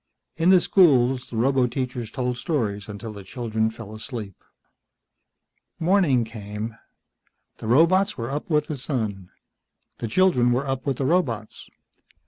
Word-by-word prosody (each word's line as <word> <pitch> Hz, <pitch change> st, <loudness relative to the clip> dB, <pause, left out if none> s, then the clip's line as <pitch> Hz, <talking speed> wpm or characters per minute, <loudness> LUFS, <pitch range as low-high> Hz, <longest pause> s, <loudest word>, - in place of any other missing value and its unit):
In 165 Hz, +3 st, +2 dB
the 185 Hz, -1 st, +7 dB
schools, 135 Hz, -9 st, +3 dB
the -, -, -8 dB
roboteachers 125 Hz, -1 st, 0 dB
told 125 Hz, -2 st, -2 dB
stories 110 Hz, -, -2 dB
until 105 Hz, +2 st, -7 dB
the 100 Hz, -1 st, -9 dB
children 110 Hz, +1 st, -1 dB
fell 110 Hz, -1 st, -10 dB
asleep. 110 Hz, -3 st, -7 dB, 1.4 s
Morning 165 Hz, -8 st, +3 dB
came. 110 Hz, 0 st, -6 dB, 0.8 s
The -, -, -7 dB
robots 185 Hz, -, +4 dB
were 120 Hz, +1 st, -4 dB
up 145 Hz, +4 st, -4 dB
with 150 Hz, -2 st, +2 dB
the 150 Hz, -3 st, -5 dB
sun. 110 Hz, -, -3 dB, 0.7 s
The 115 Hz, -, -3 dB
children 125 Hz, -, +3 dB
were 130 Hz, +3 st, 0 dB
up 135 Hz, 0 st, -3 dB
with 135 Hz, -3 st, 0 dB
the 135 Hz, -, -1 dB
robots. 130 Hz, -9 st, -1 dB
125 Hz, 135 wpm, -24 LUFS, 110-145 Hz, 1.4 s, the